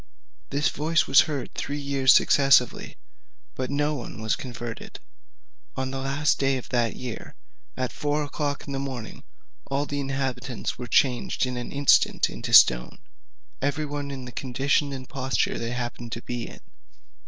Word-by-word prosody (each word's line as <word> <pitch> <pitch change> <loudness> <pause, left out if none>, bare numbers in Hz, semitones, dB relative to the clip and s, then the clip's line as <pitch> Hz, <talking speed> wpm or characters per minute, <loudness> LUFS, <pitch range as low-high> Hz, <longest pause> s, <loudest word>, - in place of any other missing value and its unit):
"This 145 +1 +1
voice 160 +3 +1
was 135 - +7
heard 145 -4 -4
three 145 - -3
years 140 -2 +3
successively, 135 -3 +4 0.6
but 130 -1 -4
no 145 +2 0
one 125 -5 -6
was 110 0 0
converted. 120 -3 -7 0.8
On 130 0 -3
the 135 - -4
last 140 +3 +1
day 135 -1 +2
of 125 - -9
that 120 -2 0
year, 125 -3 -7 0.4
at 130 -2 -2
four 150 0 -1
o'clock 145 0 -3
in 140 - -6
the 135 - -2
morning, 130 -5 -6 0.5
all 140 +1 0
the 145 -1 -3
inhabitants 135 -3 -3
were 125 - -5
changed 125 +2 +2
in 125 0 -4
an 125 -1 -5
instant 140 0 +3
into - - -6
stone, - - +6 0.6
every 145 +2 0
one 145 -1 -4
in 135 -2 -6
the 125 - -8
condition 140 +4 0
and 130 -2 -7
posture 130 -1 -1
they 115 - -3
happened 120 -1 -5
to 115 - -6
be 120 -1 -4
in. - - -13
135 Hz, 165 wpm, -25 LUFS, 125-140 Hz, 0.8 s, was